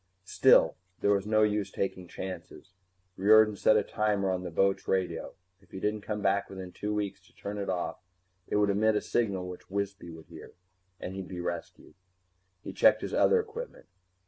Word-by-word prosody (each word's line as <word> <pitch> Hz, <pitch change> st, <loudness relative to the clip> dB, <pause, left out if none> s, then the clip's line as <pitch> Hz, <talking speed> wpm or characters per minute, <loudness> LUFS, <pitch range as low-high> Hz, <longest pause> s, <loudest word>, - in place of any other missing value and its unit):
Still, -, -, +5 dB, 0.2 s
there 100 Hz, -, +3 dB
was 100 Hz, 0 st, +1 dB
no 110 Hz, 0 st, +4 dB
use 105 Hz, -1 st, +1 dB
taking 95 Hz, -2 st, -3 dB
chances. 95 Hz, +1 st, -8 dB, 0.5 s
Riordan 105 Hz, +2 st, +6 dB
set 110 Hz, +2 st, +4 dB
a 105 Hz, -, +2 dB
timer 100 Hz, -3 st, 0 dB
on 90 Hz, -1 st, -1 dB
the 90 Hz, -, -5 dB
boat's 95 Hz, +3 st, +1 dB
radio. 90 Hz, -4 st, -1 dB, 0.3 s
If 95 Hz, -, -25 dB
he 95 Hz, -, -7 dB
didn't 105 Hz, +2 st, -1 dB
come 105 Hz, 0 st, -4 dB
back 100 Hz, +1 st, +1 dB
within 95 Hz, -2 st, -8 dB
two 105 Hz, +3 st, -4 dB
weeks 105 Hz, -2 st, -3 dB
to -, -, -26 dB
turn 100 Hz, +1 st, -6 dB
it 100 Hz, -, -3 dB
off, 90 Hz, -2 st, -2 dB, 0.5 s
it -, -, -2 dB
would 105 Hz, -1 st, +3 dB
emit 110 Hz, +2 st, +2 dB
a 105 Hz, -, +1 dB
signal 100 Hz, -6 st, -1 dB
which 90 Hz, 0 st, -10 dB
Wisby 100 Hz, -2 st, -3 dB
would 80 Hz, -2 st, -11 dB
hear, -, -, -12 dB, 0.5 s
and 90 Hz, -, -6 dB
he'd 95 Hz, -1 st, -6 dB
be 90 Hz, -, -7 dB
rescued. 85 Hz, -1 st, -6 dB, 0.7 s
He -, -, -7 dB
checked -, -, +4 dB
his -, -, -4 dB
other 465 Hz, -, +4 dB
equipment. 455 Hz, +3 st, -7 dB
100 Hz, 190 wpm, -29 LUFS, 95-105 Hz, 0.7 s, Riordan